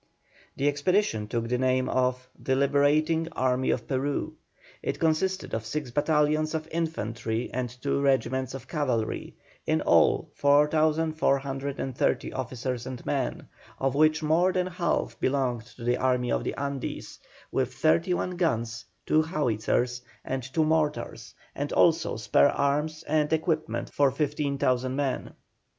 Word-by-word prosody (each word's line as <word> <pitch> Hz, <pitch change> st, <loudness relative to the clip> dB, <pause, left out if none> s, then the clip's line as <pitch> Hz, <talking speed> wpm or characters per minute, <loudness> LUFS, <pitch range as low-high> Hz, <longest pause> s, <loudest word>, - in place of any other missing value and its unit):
The 140 Hz, -, +1 dB
expedition 145 Hz, -, +1 dB
took 115 Hz, 0 st, -2 dB
the 125 Hz, +1 st, 0 dB
name 130 Hz, 0 st, +2 dB
of 125 Hz, 0 st, 0 dB
"The 130 Hz, -, -1 dB
Liberating 145 Hz, +4 st, +2 dB
Army 130 Hz, 0 st, +1 dB
of 120 Hz, -, -1 dB
Peru." 140 Hz, +1 st, -1 dB, 0.5 s
It -, -, -3 dB
consisted 175 Hz, +4 st, 0 dB
of 110 Hz, -, -1 dB
six 130 Hz, +3 st, -4 dB
battalions 155 Hz, +2 st, +1 dB
of 155 Hz, 0 st, -3 dB
infantry 115 Hz, -8 st, -2 dB
and 125 Hz, 0 st, -2 dB
two 130 Hz, +3 st, -2 dB
regiments 130 Hz, -1 st, +1 dB
of 130 Hz, -1 st, -9 dB
cavalry, 130 Hz, -9 st, -2 dB, 0.3 s
in -, -, +2 dB
all -, -, +3 dB
4,430 145 Hz, -3 st, +1 dB
officers 125 Hz, -1 st, -4 dB
and 130 Hz, -1 st, -7 dB
men, 135 Hz, -4 st, -2 dB, 0.3 s
of 135 Hz, -1 st, 0 dB
which 155 Hz, +2 st, +3 dB
more 165 Hz, +4 st, +3 dB
than 180 Hz, -1 st, 0 dB
half 180 Hz, -1 st, -2 dB
belonged 130 Hz, -4 st, 0 dB
to 120 Hz, -, -10 dB
the 120 Hz, +1 st, +1 dB
Army 125 Hz, -1 st, +1 dB
of -, -, 0 dB
the -, -, -3 dB
Andes, 140 Hz, -1 st, -5 dB, 0.3 s
with -, -, 0 dB
thirty 85 Hz, -, +2 dB
one 180 Hz, 0 st, -3 dB
guns, 115 Hz, -9 st, -1 dB, 0.2 s
two 155 Hz, -, +4 dB
howitzers, 125 Hz, -, 0 dB, 0.2 s
and 130 Hz, 0 st, -2 dB
two 130 Hz, +6 st, 0 dB
mortars, 155 Hz, -1 st, -1 dB, 0.2 s
and -, -, -3 dB
also -, -, +3 dB
spare 70 Hz, -, +4 dB
arms 150 Hz, +3 st, 0 dB
and 150 Hz, 0 st, +1 dB
equipment 160 Hz, 0 st, -1 dB
for 140 Hz, -1 st, +4 dB
15,000 140 Hz, -3 st, 0 dB
men. 140 Hz, -2 st, -2 dB
140 Hz, 135 wpm, -27 LUFS, 125-155 Hz, 0.5 s, two